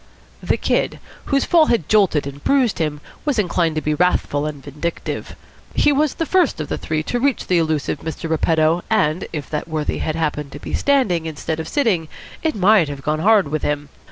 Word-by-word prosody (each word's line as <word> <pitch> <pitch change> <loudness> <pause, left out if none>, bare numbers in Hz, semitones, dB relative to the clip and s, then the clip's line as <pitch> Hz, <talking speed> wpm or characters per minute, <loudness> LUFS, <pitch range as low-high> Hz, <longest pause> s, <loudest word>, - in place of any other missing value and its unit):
The - - 0
Kid, - - 0 0.3
whose 275 -1 +1
fall 325 -3 +5
had 205 -11 +1
jolted 195 -9 +3
and 140 0 -8
bruised 260 -8 +2
him, 150 -2 -2 0.2
was 290 -4 0
inclined 170 -5 +1
to 155 - 0
be 150 - +1
wrathful 150 -3 +1
and 145 -3 -7
vindictive. 150 +5 -5 0.4
He 295 - +4
was 290 0 +1
the 330 - -1
first 355 - +2
of 155 - -4
the - - -2
three 155 0 -2
to 245 - -2
reach 275 +1 +1
the 180 -2 +2
elusive 155 -3 -1
Mr. 160 +1 -5
Repetto, 160 +1 +2
and 185 -5 +1
if 150 -4 -5
that 150 +1 -3
worthy 155 -2 -2
had 155 - -2
happened 150 -3 -2
to 145 - -7
be - - -7
standing 210 - +2
instead 160 +1 -4
of 160 - -4
sitting 210 - +1 0.3
it 320 -1 0
might 195 -4 +4
have 140 -1 -7
gone 155 +1 0
hard 205 -3 +4
with 155 0 -2
him. 145 0 -2
160 Hz, 205 wpm, -20 LUFS, 150-215 Hz, 0.4 s, fall